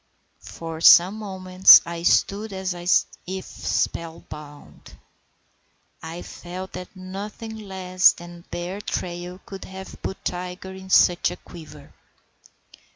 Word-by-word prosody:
For 165 Hz, -1 st, -7 dB
some 175 Hz, +3 st, +8 dB
moments 190 Hz, -2 st, +7 dB
I 170 Hz, 0 st, -6 dB
stood 200 Hz, +4 st, +1 dB
as 190 Hz, -1 st, -3 dB, 0.5 s
if 190 Hz, 0 st, -5 dB
spell 165 Hz, 0 st, -3 dB
bound. 150 Hz, -1 st, -12 dB, 1.1 s
I 165 Hz, +2 st, -7 dB
felt 185 Hz, +2 st, -8 dB
that 180 Hz, +1 st, -9 dB
nothing 200 Hz, +4 st, -7 dB
less 190 Hz, -3 st, +2 dB
than 175 Hz, 0 st, -11 dB
a 170 Hz, -, -22 dB
bear 180 Hz, +4 st, -5 dB
trail 180 Hz, -1 st, -5 dB
could 195 Hz, -1 st, -9 dB
have 190 Hz, 0 st, -10 dB
put 190 Hz, -, -6 dB
Tiger 180 Hz, +1 st, -5 dB
in 190 Hz, 0 st, -11 dB
such 175 Hz, -2 st, +4 dB
a -, -, -7 dB
quiver. 155 Hz, -4 st, -13 dB
185 Hz, 120 wpm, -23 LUFS, 175-190 Hz, 1.1 s, some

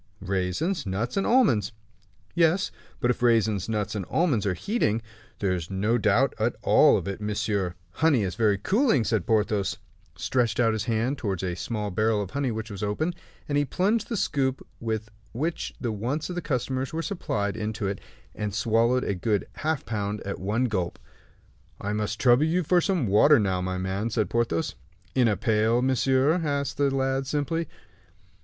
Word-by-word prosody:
"Raisins, 95 Hz, -, -1 dB
nuts, 105 Hz, +6 st, -2 dB
and 195 Hz, -, +1 dB
almonds." 130 Hz, -, +3 dB, 0.6 s
"Yes; 170 Hz, +3 st, +2 dB, 0.3 s
but 120 Hz, -, +2 dB
if 125 Hz, -, -4 dB
raisins, 110 Hz, -4 st, +2 dB
nuts, 105 Hz, -2 st, -1 dB
and 105 Hz, -3 st, -2 dB
almonds 145 Hz, -, +1 dB
are 90 Hz, -, 0 dB
heating 115 Hz, -, 0 dB, 0.2 s
" 115 Hz, -, -27 dB
"There 95 Hz, -2 st, +1 dB
is 85 Hz, -2 st, -4 dB
no 105 Hz, +5 st, +1 dB
doubt 115 Hz, +6 st, +3 dB
at 115 Hz, +2 st, +1 dB
all -, -, +6 dB
of -, -, -4 dB
it, 100 Hz, +1 st, -4 dB
monsieur." 100 Hz, -3 st, -1 dB, 0.2 s
"Honey 145 Hz, -, +2 dB
is 95 Hz, -2 st, -2 dB
very 110 Hz, -3 st, +2 dB
cooling," 200 Hz, -, +2 dB
said 110 Hz, -5 st, -1 dB
Porthos, 105 Hz, -2 st, +1 dB, 0.4 s
stretching 120 Hz, -2 st, +1 dB
out 110 Hz, -, +3 dB
his 110 Hz, -1 st, -2 dB
hand 120 Hz, +5 st, 0 dB
toward 95 Hz, -5 st, -2 dB
a 90 Hz, -2 st, -2 dB
small 105 Hz, +1 st, -3 dB
barrel 110 Hz, +3 st, +1 dB
of 100 Hz, -3 st, -4 dB
honey 140 Hz, -1 st, -1 dB
which 110 Hz, -1 st, -4 dB
was 100 Hz, -, -6 dB
open, 105 Hz, +12 st, -1 dB, 0.3 s
and 145 Hz, -1 st, +1 dB
he -, -, +3 dB
plunged 200 Hz, +9 st, 0 dB
the 230 Hz, -, -1 dB
scoop 135 Hz, -7 st, 0 dB
with 110 Hz, -1 st, -3 dB, 0.2 s
which 155 Hz, +8 st, -2 dB
the 120 Hz, -, -2 dB
wants 125 Hz, -, -2 dB
of -, -, -5 dB
the 175 Hz, -, -2 dB
customers 130 Hz, -2 st, -2 dB
were 165 Hz, +1 st, -3 dB
supplied 105 Hz, -, -2 dB
into 110 Hz, -1 st, -3 dB
it, 100 Hz, -1 st, -3 dB, 0.3 s
and 105 Hz, -2 st, -4 dB
swallowed 115 Hz, +3 st, +2 dB
a -, -, -1 dB
good 100 Hz, +2 st, 0 dB
half 155 Hz, -2 st, -1 dB
pound 105 Hz, -1 st, -2 dB
at 100 Hz, -, -5 dB
one 105 Hz, +6 st, 0 dB
gulp. 95 Hz, -7 st, -2 dB, 0.8 s
"I 105 Hz, +1 st, -3 dB
must 105 Hz, +1 st, -2 dB
trouble 125 Hz, +3 st, +5 dB
you 175 Hz, +3 st, +1 dB
for 175 Hz, +3 st, +3 dB
some 180 Hz, -, +1 dB
water 110 Hz, +9 st, +6 dB
now, 95 Hz, -5 st, 0 dB
my 90 Hz, 0 st, -2 dB
man," 95 Hz, +4 st, -2 dB
said 110 Hz, -4 st, -1 dB
Porthos. 115 Hz, -8 st, 0 dB, 0.4 s
"In 125 Hz, -2 st, +3 dB
a 105 Hz, -3 st, +1 dB
pail, 110 Hz, +3 st, +2 dB
monsieur?" 130 Hz, +5 st, +2 dB
asked 140 Hz, -2 st, -1 dB
the 140 Hz, 0 st, +3 dB
lad, 135 Hz, 0 st, 0 dB
simply. 150 Hz, +3 st, -1 dB
115 Hz, 185 wpm, -26 LUFS, 105-140 Hz, 0.8 s, all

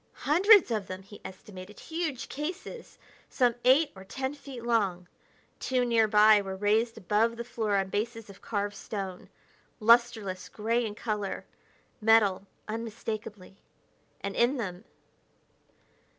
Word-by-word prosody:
Hundreds 370 Hz, -, +6 dB
of 215 Hz, -4 st, -1 dB
them, 185 Hz, +1 st, -7 dB
he 205 Hz, +1 st, -14 dB
estimated; 190 Hz, +1 st, -11 dB
huge 320 Hz, -6 st, -4 dB
cases, 355 Hz, -, -6 dB, 0.3 s
some 245 Hz, -3 st, +2 dB
eight 270 Hz, +5 st, +5 dB
or 190 Hz, -, -11 dB
ten 265 Hz, +7 st, -4 dB
feet 275 Hz, -4 st, -10 dB
long. 200 Hz, -7 st, 0 dB, 0.5 s
Two 255 Hz, -1 st, 0 dB
nearby 215 Hz, -2 st, +5 dB
were 190 Hz, -1 st, -5 dB
raised 215 Hz, +4 st, +1 dB
above 225 Hz, +3 st, +1 dB
the 235 Hz, -, -4 dB
floor 220 Hz, -4 st, -1 dB
on 195 Hz, -1 st, 0 dB
bases 225 Hz, +2 st, -3 dB
of 200 Hz, -1 st, -14 dB
carved 205 Hz, -1 st, -3 dB
stone. 195 Hz, -3 st, -6 dB, 0.5 s
Lusterless 225 Hz, -4 st, +3 dB
gray 230 Hz, +3 st, 0 dB
in 205 Hz, -, -7 dB
color 210 Hz, -3 st, -3 dB, 0.6 s
metal, 210 Hz, -3 st, +4 dB, 0.2 s
unmistakably 215 Hz, -3 st, -6 dB, 0.6 s
and 200 Hz, 0 st, -4 dB
in 245 Hz, +4 st, +2 dB
them.... 190 Hz, -3 st, -5 dB
220 Hz, 125 wpm, -29 LUFS, 200-240 Hz, 0.6 s, Hundreds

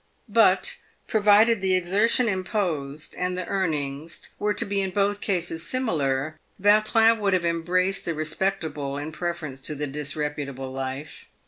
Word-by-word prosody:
But, 205 Hz, -3 st, +4 dB, 0.3 s
provided 215 Hz, +1 st, +4 dB
the 190 Hz, -1 st, +2 dB
exertion 205 Hz, +7 st, +3 dB
imposed 175 Hz, -8 st, -2 dB
and 180 Hz, 0 st, -2 dB
the 185 Hz, -, -3 dB
earnings 155 Hz, -4 st, -3 dB
were 210 Hz, -1 st, 0 dB
to -, -, 0 dB
be 200 Hz, 0 st, 0 dB
in 190 Hz, -, -1 dB
both 200 Hz, +2 st, 0 dB
cases 175 Hz, -4 st, -1 dB
similar, 155 Hz, -, -1 dB, 0.2 s
Vautrin 215 Hz, +3 st, +4 dB
would 200 Hz, -2 st, +1 dB
have 180 Hz, -2 st, +1 dB
embraced 180 Hz, +3 st, 0 dB
the 165 Hz, -, -2 dB
respectable 155 Hz, -3 st, -2 dB
in 145 Hz, +2 st, -5 dB
preference 165 Hz, -5 st, -4 dB
to 150 Hz, -, -4 dB
the 150 Hz, +1 st, -2 dB
disreputable 145 Hz, -2 st, -4 dB
life. 135 Hz, +2 st, -6 dB
175 Hz, 140 wpm, -25 LUFS, 150-200 Hz, 0.3 s, But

